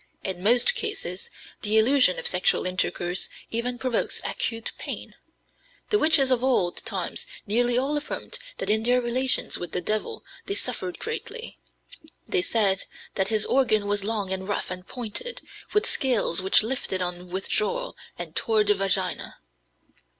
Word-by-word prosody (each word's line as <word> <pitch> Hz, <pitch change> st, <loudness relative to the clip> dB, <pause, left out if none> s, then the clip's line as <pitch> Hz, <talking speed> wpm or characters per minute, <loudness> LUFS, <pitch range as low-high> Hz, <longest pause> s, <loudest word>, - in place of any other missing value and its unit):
In 185 Hz, -2 st, -3 dB
most 240 Hz, -, +6 dB
cases 405 Hz, -, -3 dB, 0.3 s
the 215 Hz, +1 st, +2 dB
illusion 240 Hz, -4 st, +4 dB
of -, -, -6 dB
sexual 180 Hz, 0 st, +2 dB
intercourse 180 Hz, 0 st, 0 dB, 0.2 s
even 245 Hz, +2 st, -2 dB
provokes 250 Hz, -2 st, -1 dB
acute 225 Hz, -1 st, -1 dB
pain. -, -, -4 dB, 0.8 s
The 420 Hz, -, +4 dB
witches 295 Hz, -4 st, +5 dB
of 250 Hz, -1 st, +2 dB
old 215 Hz, -10 st, +2 dB
times 190 Hz, -6 st, -4 dB, 0.2 s
nearly 240 Hz, +3 st, +1 dB
all 275 Hz, +4 st, +1 dB
affirmed 300 Hz, +10 st, -3 dB, 0.2 s
that -, -, -4 dB
in 220 Hz, +1 st, +2 dB
their 245 Hz, +2 st, +3 dB
relations 250 Hz, +2 st, 0 dB
with 175 Hz, -2 st, -6 dB
the -, -, +1 dB
devil 215 Hz, -, 0 dB, 0.2 s
they 400 Hz, -, -1 dB
suffered 185 Hz, -, -2 dB
greatly. -, -, -6 dB, 0.7 s
They -, -, +3 dB
said 200 Hz, -1 st, +2 dB, 0.3 s
that 190 Hz, -1 st, 0 dB
his 215 Hz, -1 st, +2 dB
organ 225 Hz, -6 st, +2 dB
was 205 Hz, 0 st, +1 dB
long 205 Hz, -3 st, -1 dB
and 190 Hz, 0 st, -4 dB
rough 205 Hz, -3 st, -3 dB
and 185 Hz, 0 st, -6 dB
pointed, 250 Hz, -, -3 dB, 0.3 s
with 420 Hz, -, +2 dB
scales 240 Hz, -9 st, +2 dB
which 190 Hz, +3 st, +5 dB
lifted 220 Hz, -6 st, 0 dB
on 180 Hz, 0 st, -4 dB
withdrawal 440 Hz, -, -1 dB, 0.2 s
and -, -, -6 dB
tore 220 Hz, -2 st, +3 dB
the 205 Hz, 0 st, +3 dB
vagina." 195 Hz, -2 st, -1 dB
220 Hz, 150 wpm, -25 LUFS, 190-255 Hz, 0.8 s, most